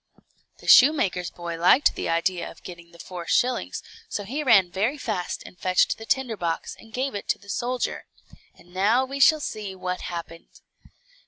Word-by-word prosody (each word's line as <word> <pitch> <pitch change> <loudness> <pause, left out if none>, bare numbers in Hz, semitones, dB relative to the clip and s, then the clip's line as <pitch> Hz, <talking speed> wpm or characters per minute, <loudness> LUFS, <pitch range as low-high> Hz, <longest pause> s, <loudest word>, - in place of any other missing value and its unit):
The - - -15
shoemaker's 250 - +5
boy 170 -1 -7
liked 185 +11 +5
the - - -4
idea 170 +2 0
of - - -15
getting 170 -1 -10
the 170 - -16
four 175 -1 -8
shillings, 250 0 0 0.3
so 205 - -3
he 265 +10 -4
ran 200 -9 +5
very 220 +11 0
fast 215 -9 -4
and 180 - -13
fetched 185 +3 +2
the 225 - -10
tinder 260 -4 0
box, 170 -4 -3
and 225 - -16
gave 260 +4 -2
it 205 - -6
to - - +1
the 200 - -18
soldier. 245 +4 -2 0.5
And 175 +1 -20
now 215 +7 +2
we 275 +1 -6
shall 310 +3 +6
see 210 -8 -5
what 180 -1 -4
happened. 170 -1 -8
200 Hz, 180 wpm, -25 LUFS, 175-250 Hz, 0.5 s, shall